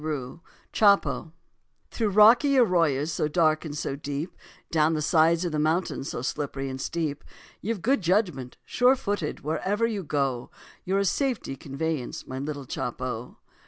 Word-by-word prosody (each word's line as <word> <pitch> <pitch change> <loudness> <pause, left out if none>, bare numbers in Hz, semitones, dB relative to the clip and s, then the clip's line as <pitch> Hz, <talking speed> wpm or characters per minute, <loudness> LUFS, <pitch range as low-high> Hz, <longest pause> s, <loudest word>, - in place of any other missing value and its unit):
CHOPO 200 -5 +3 0.6
Through 225 -3 0
rocky 235 +8 +6
arroyas 165 - +3
so 155 - 0
dark 155 0 +2
and 150 -2 -6
so 135 - -3
deep, 145 +4 -5 0.4
Down 160 0 +3
the - - -1
sides 165 +2 +3
of 175 - -1
the 155 - -1
mountains 155 -2 0
so 120 - -4
slippery 135 0 -3
and 130 0 -5
steep, 155 -2 -3 0.4
You've 210 -3 -3
good 270 -1 +2
judgment, 175 - 0
sure 250 +2 +4
footed, 205 - -3
wherever 195 +9 0
you 215 -4 -2
go, 135 -5 -1 0.4
You're 190 +2 +1
a 200 - +2
safety 245 - -1
conveyance, 140 0 -4
my 130 0 -6
little 140 0 -5
Chopo. - - -5
160 Hz, 150 wpm, -26 LUFS, 145-200 Hz, 0.6 s, rocky